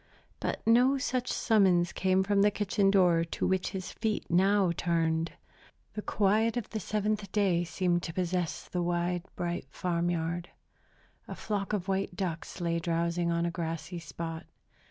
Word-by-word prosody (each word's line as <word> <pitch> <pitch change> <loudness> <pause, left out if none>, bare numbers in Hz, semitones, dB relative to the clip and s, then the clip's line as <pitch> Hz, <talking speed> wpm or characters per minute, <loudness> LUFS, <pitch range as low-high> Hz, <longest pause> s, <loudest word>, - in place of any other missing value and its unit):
But - - -3
no 250 +4 +5
such 255 -2 -1
summons 190 -6 +3
came 190 0 +2
from 200 0 +2
the 205 - +6
kitchen 205 -1 +1
door 180 -4 +4
to 165 - -3
which 190 -1 +1
his 185 -1 -5
feet 220 -1 -2
now 190 +1 +4
turned. 165 -1 0 0.6
The 210 - -4
quiet 215 +4 +2
of 240 - -3
the 220 - -2
Seventh 210 -2 -2
Day 190 -5 +2
seemed 175 0 0
to 165 - -5
possess 180 -2 -2
the 180 - -2
wide, 175 0 0
bright 175 -4 -3
farm 175 +2 -1
yard. 170 0 -2 0.8
A - - -6
flock 205 -2 -3
of 200 -3 -2
white 195 -1 -1
ducks 175 -2 -4
lay 170 -1 0
drowsing 170 +1 0
on 170 0 +1
a 170 - -1
grassy 165 0 -4
spot. 165 0 -6
180 Hz, 160 wpm, -30 LUFS, 170-200 Hz, 0.8 s, the